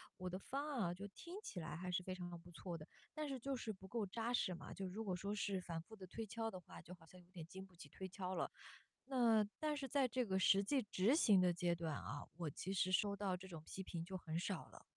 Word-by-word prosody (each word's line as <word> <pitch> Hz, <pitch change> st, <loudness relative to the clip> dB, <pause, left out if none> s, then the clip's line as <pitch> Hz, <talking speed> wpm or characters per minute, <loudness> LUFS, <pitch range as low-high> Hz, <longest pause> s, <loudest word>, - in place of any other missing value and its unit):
我 185 Hz, 0 st, -3 dB
的 185 Hz, +1 st, -2 dB
方 275 Hz, +8 st, -2 dB
案 270 Hz, -6 st, +1 dB
啊， 175 Hz, 0 st, +2 dB
就 195 Hz, +3 st, -6 dB
听 340 Hz, -, -8 dB
起 185 Hz, -, -4 dB
来 165 Hz, +1 st, -3 dB
还 180 Hz, +2 st, -2 dB
是 180 Hz, -, +2 dB
非 185 Hz, 0 st, -2 dB
常 175 Hz, -1 st, -5 dB
不 175 Hz, +1 st, -13 dB
错 170 Hz, 0 st, -4 dB
的。 155 Hz, -, -9 dB, 0.3 s
但 305 Hz, -1 st, -1 dB
是 270 Hz, -2 st, -1 dB
就 270 Hz, +3 st, -1 dB
是 220 Hz, -3 st, -2 dB
不 190 Hz, -1 st, -12 dB
够 210 Hz, +2 st, 0 dB
扎 230 Hz, +5 st, -1 dB
实 185 Hz, -6 st, +3 dB
嘛， -, -, -7 dB
就 190 Hz, -1 st, -3 dB
如 210 Hz, +5 st, -3 dB
果 195 Hz, -, 0 dB
说 200 Hz, +4 st, -1 dB
是 200 Hz, -2 st, +1 dB
反 165 Hz, -2 st, -3 dB
复 220 Hz, -, -15 dB
的 190 Hz, -3 st, -8 dB
推 225 Hz, +5 st, -3 dB
敲 225 Hz, +2 st, -1 dB
的 185 Hz, -, -5 dB
话， -, -, -10 dB
就 180 Hz, +2 st, -9 dB
好 165 Hz, -2 st, -17 dB
像 180 Hz, +3 st, -14 dB
有 175 Hz, -, -21 dB
点 175 Hz, -3 st, -7 dB
经 190 Hz, +3 st, -7 dB
不 185 Hz, -, -19 dB
起 170 Hz, -, -10 dB
推 190 Hz, -, -5 dB
敲 185 Hz, 0 st, -3 dB
了。 -, -, +1 dB, 0.6 s
那 240 Hz, -5 st, +5 dB, 0.2 s
但 305 Hz, -1 st, +1 dB
是 275 Hz, -2 st, -2 dB
在 275 Hz, +1 st, +4 dB
这 250 Hz, +1 st, +1 dB
个 190 Hz, -3 st, +2 dB
实 195 Hz, +1 st, +7 dB
际 265 Hz, +6 st, +3 dB
执 210 Hz, +5 st, +4 dB
行 210 Hz, -, +7 dB
的 180 Hz, -1 st, +5 dB
阶 175 Hz, 0 st, +2 dB
段 165 Hz, -3 st, -1 dB
啊， 145 Hz, 0 st, -4 dB
我 165 Hz, -3 st, -1 dB
其 185 Hz, +7 st, -3 dB
实 185 Hz, -1 st, +3 dB
收 200 Hz, +1 st, +4 dB
到 195 Hz, -3 st, +1 dB
这 190 Hz, -, -9 dB
种 165 Hz, -4 st, -7 dB
批 190 Hz, -, -5 dB
评 170 Hz, -2 st, -3 dB
就 185 Hz, +2 st, -3 dB
很 165 Hz, -2 st, -2 dB
少 185 Hz, -1 st, -1 dB
了。 -, -, -13 dB
190 Hz, 300 characters per minute, -42 LUFS, 175-225 Hz, 0.6 s, 实